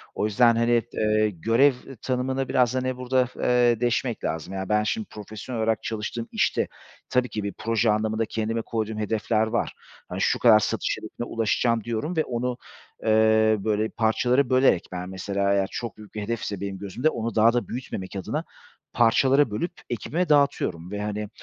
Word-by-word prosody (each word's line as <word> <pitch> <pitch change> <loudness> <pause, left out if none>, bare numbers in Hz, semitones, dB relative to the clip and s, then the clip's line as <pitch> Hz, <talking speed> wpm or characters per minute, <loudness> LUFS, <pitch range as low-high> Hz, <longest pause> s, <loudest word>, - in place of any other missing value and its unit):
O - - 0
yüzden, 115 +2 +4
hani, 115 0 +3
t - - -11
eee, 110 0 +3
görev 115 - +3 0.3
tanımını 130 +1 -1
biraz, 125 -1 +2
hani, 130 0 -1
burada, 125 0 +1
f 130 - -14
eee, 120 -2 +3
deşmek 120 -1 -1
lazım. 80 +4 -3
Yani, 95 -1 -4
ben 105 0 +3
şimdi 215 - -2
profesyonel 110 +3 -7
olarak 110 -1 0
çalıştığım 115 +1 -4
işte - - +1 0.4
tabii 125 0 +1
ki 105 - -4
bir 100 - -3
proje 115 0 +1
anlamında 110 +1 0
kendime 115 +1 -2
koyduğum 110 -1 -3
hedefler 110 +1 0
var. 115 +2 -1 0.4
Hani, - - -4
şu - - +2
kadar 110 -3 +7
satış - - -1
hedefine 110 +2 -7
ulaşacağım, 115 0 +1
diyorum 120 - -3
ve 155 - +3
onu, 125 -1 -2 0.5
eee, 110 0 +4
böyle, 110 +1 0
parçalara 120 +4 +1
bölerek 130 -9 +3
Ben 90 0 -5
mesela 100 +1 -1
eğer 100 -1 +2
çok 115 -2 -5
büyük 105 -1 -13
bir 105 - -3
hedefse 105 -2 -3
benim 100 -1 -4
gözümde, 110 +9 0
onu 115 -6 -4
daha 115 +2 +5
da 120 - -1
büyütmemek 105 -6 -6
adına 95 - -3 0.5
parçalara 130 +3 +4
bölüp 170 - -2 0.2
ekibime 160 +9 -2
dağıtıyorum 95 - +1
ve, 105 0 -3
hani, 105 0 -3
115 Hz, 175 wpm, -25 LUFS, 105-125 Hz, 0.5 s, kadar